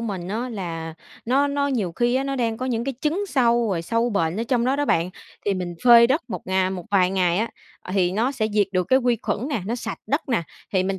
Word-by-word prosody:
mình 195 -6 -4
á 230 +5 -2
là 165 -7 -5 0.3
nó 270 +4 +2
nó 280 0 0
nhiều 225 -11 -1
khi 240 +7 +1
á, 265 +1 +1
nó 275 0 -2
đang 230 -2 0
có 255 - -3
những 235 -2 -1
cái 275 0 -3
chứng 335 +7 0
sâu, 240 -6 +2
rồi 175 -4 -1
sâu 230 +7 0
bệnh 165 -4 0
ở - - 0
trong 240 -2 +2
đó 260 +2 +1
đó 290 - 0
bạn 170 -9 +1 0.4
thì 200 - +2
mình 180 -2 -4
phơi 235 -1 +8
đất 275 +6 +1
một 180 - -5
ngà 190 0 +1
một 185 -2 -5
vài 185 -3 +3
ngày 180 -2 +1
á, 225 +2 0 0.3
ờ, 185 - -8
thì 185 -2 +2
nó 235 +7 +1
sẽ 235 -6 -1
diệt 205 -1 +3
được 185 -1 +1
cái 260 - +5
quy 245 -2 +1
khuẩn 220 +5 -2
nè, 250 -11 -2
nó 230 - -1
sạch - - -5
đất 285 +1 -1
nè, 235 -9 +1 0.3
thì 190 -2 +3
mình 190 0 -2
225 Hz, 270 wpm, -23 LUFS, 185-255 Hz, 0.4 s, phơi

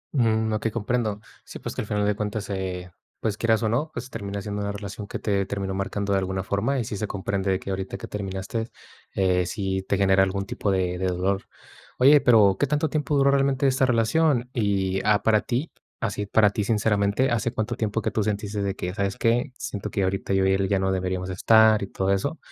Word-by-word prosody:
Mm, 110 -3 +2
okey 110 +1 0
comprendo. 110 -2 -1 0.2
Sí, - - -9
pues - - -6
que - - -2
al 105 - -6
final 105 -1 0
de 105 -1 +1
cuentas, 105 -1 -3
eh, 90 -2 -4 0.3
pues 110 -2 -1
quieras 115 +1 +1
o 110 - +1
no, 140 +8 0
pues 125 +3 -6
termina 100 -2 -5
siendo 105 0 -4
una 100 0 -2
relación 100 0 -7
que - - -5
te 100 -2 -1
terminó 100 -1 -3
marcando 100 +1 -2
de 95 - +3
alguna 95 0 -2
forma, 110 +9 0
y 120 - 0
sí 105 - -4
se 105 +1 -2
comprende 100 0 -2
de 95 0 +1
que 100 - -6
ahorita 95 0 -4
que - - -7
terminaste, 100 +3 -4 0.5
eh, 90 -2 +2
sí 95 -2 -2
te 100 - +2
genera 95 -1 +4
algún 95 +1 0
tipo 100 - -3
de 90 -2 0
de 95 - 0
dolor. 95 +2 0 0.5
Oye, 140 +3 +7
pero, 105 -5 +5
¿qué 145 - +2
tanto 150 +2 0
tiempo 150 0 -1
duró 140 0 +4
realmente 140 0 +2
esta 130 0 +3
relación?, 125 +2 +2
y, 95 -4 0
ah, 105 -1 +3
para 110 -1 +4
ti, 130 +6 -2 0.3
así 105 -2 -2
para 105 -1 +4
ti 105 - -1
sinceramente, 105 +3 +1
hace 120 0 0
cuánto 110 -3 -2
tiempo 110 0 -1
que - - -1
tú 110 - 0
sentiste 105 0 -2
de 100 -1 -1
que: 90 -1 -4
"¿Sabes 100 -1 -2
qué?, 120 +4 +1
siento 100 - -5
que 100 - -1
ahorita 95 +1 -1
yo 95 0 +3
y 95 - +3
él 95 0 +1
ya 100 - +2
no 95 0 0
deberíamos 95 0 -2
estar", 110 +2 +5
y 100 - -3
todo 95 0 -1
eso, 140 +11 -1
105 Hz, 225 wpm, -25 LUFS, 95-115 Hz, 0.5 s, Oye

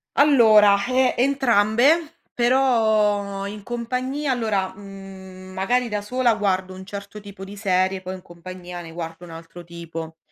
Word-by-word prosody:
Allora, 215 -8 +5
ehm, 255 0 +2
entrambe, 270 +5 +2 0.2
però 220 -6 +2
in 205 +1 -7
compagnia 255 +5 -3
allora, 215 -6 -1
mhmm, 190 -2 -11
magari 240 +6 0
da 210 -1 -2
sola 245 +3 +1
guardo 190 -3 -1
un 190 0 -10
certo 200 +1 -8
tipo 200 -2 -11
di 195 +1 -9
serie, 190 -2 0
poi 185 0 -6
in 185 - -11
compagnia 175 0 -9
ne 165 - -10
guardo 165 0 -7
un 170 - -12
altro 165 +1 -11
tipo. 165 -1 -8
200 Hz, 145 wpm, -22 LUFS, 185-240 Hz, 0.2 s, Allora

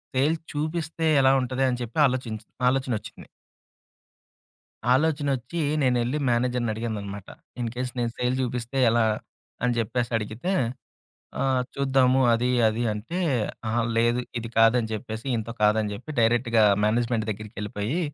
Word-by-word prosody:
Sales 155 +5 +1
చూపిస్తే 160 +2 -2 0.2
ఎలా 130 - +5
ఉంటది 130 +1 -1
అని 125 -1 -2
చెప్పి 120 +4 -6
ఆలోచించి 115 -4 -4 0.2
ఆలోచనొచ్చింది. 125 -5 -3 1.6
ఆలోచనొచ్చి 145 0 +1 0.2
నేనెళ్ళి 125 +1 +1
మేనేజర్‌ని 120 -1 +1
అడిగాననమాట. 105 -3 -5 0.3
ఇన్‌‌కేస్ 125 +2 -3
నేను 120 -1 0
సేల్ 125 +1 0
చూపిస్తే 125 +1 -3
ఎలా? 115 -1 +3 0.6
అని 125 -1 +2
జెప్పేసడిగితే 115 - -2 0.9
ఆహ్, 130 -2 +2
చూద్దాము 135 -1 +3
అది, 120 +2 +1 0.2
అది 110 +2 -1
అంటే 115 - -5 0.5
అహా! 115 +2 +1 0.2
లేదు 120 +1 +3 0.2
ఇది 115 0 -6
కాదని 115 +1 +5
చెప్పేసి 110 +1 -6
ఇయనతో 115 0 -3
కాదని 105 0 +3
చెప్పి 125 +9 -8
డైరెక్ట్‌గా 115 0 +3 0.2
మేనేజ్మెంట్ 115 0 0
దగ్గరికెళ్ళిపోయి 105 - -4
120 Hz, 115 wpm, -25 LUFS, 110-130 Hz, 1.6 s, ఎలా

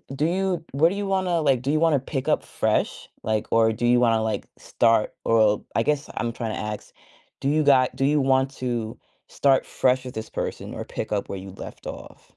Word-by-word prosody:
do 150 +3 0
you 180 -1 0
what 145 +5 +4
do 195 - -4
you 205 0 -3
wanna, 185 -3 +1
like, 135 -5 +2
do 140 +3 -1
you 155 - +2
wanna 160 -4 +4
pick 135 0 -4
up - - +2
fresh, - - -1
like, 110 -1 -1
or 110 -1 +4
do 120 +2 -2
you 120 0 +4
wanna, 115 -2 +3
like, 110 - -2
start, 115 -2 +2
or 110 -2 +3
I 115 - +3
guess 150 -1 -1
I'm 115 - -1
trying 115 -2 -4
to - - -4
ask, 105 0 -6 0.5
do 140 - -1
you 155 +1 +3
got 130 -3 +4
do 135 - -1
you 150 +1 +3
want 135 0 +2
to 120 -4 -4 0.3
start 135 -2 +2
fresh 130 0 +1
with 125 - -7
this 110 0 -5
person, - - -5
or - - -5
pick 110 - -5
up 100 -1 -1
where 100 - -4
you'd 95 0 -11
left - - -9
off? - - -9
130 Hz, 225 wpm, -24 LUFS, 115-150 Hz, 0.5 s, what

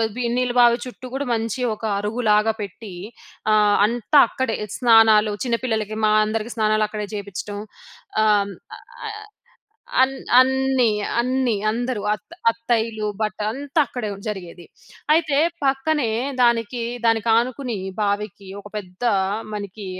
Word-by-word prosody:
వి 250 - -2
నీళ్ళ 250 -1 0
బావి 235 0 +5
చుట్టూ 255 0 -9
గూడా 280 +1 -2
మంచి 225 +2 -3
ఒక - - -21 0.2
అరుగులాగా 215 0 +1
పెట్టి, 200 0 -8 0.6
ఆహ్, 210 -1 +4
అంతా 240 +5 +3
అక్కడే 260 -4 -2 0.2
స్నానాలు 225 -3 +5
చిన్నపిల్లలకి, 225 -3 -1
మా 215 - +3
అందరికీ 220 +2 -3
స్నానాలు 215 0 +2
అక్కడే 210 0 -5
జేపించటం. 205 0 -6 0.6
ఆహ్, 205 -2 +3 1.5
అన్ 265 +1 +3 0.3
అన్ని, 265 -2 +2 0.3
అన్ని 255 -1 0 0.2
అందరూ 240 -1 -2
అత్త 215 - -6 0.2
అత్తయ్యలు 230 -2 -1
బట్ట 215 0 -2
అంతా 285 +4 -1
అక్కడే 240 -3 -5 0.2
జరిగేది. 180 -4 -7 0.5
అయితే, 310 -3 +1 0.3
పక్కనే 270 -2 +1 0.3
దానికి, 235 0 +1 0.2
దానికి 225 0 +2
ఆనుకుని 245 -1 -1 0.2
బావికి 205 -1 -2
ఒక 205 - -12
పెద్ద 185 0 -8 0.5
మనకి 205 0 -6
225 Hz, 115 wpm, -22 LUFS, 210-250 Hz, 1.5 s, బావి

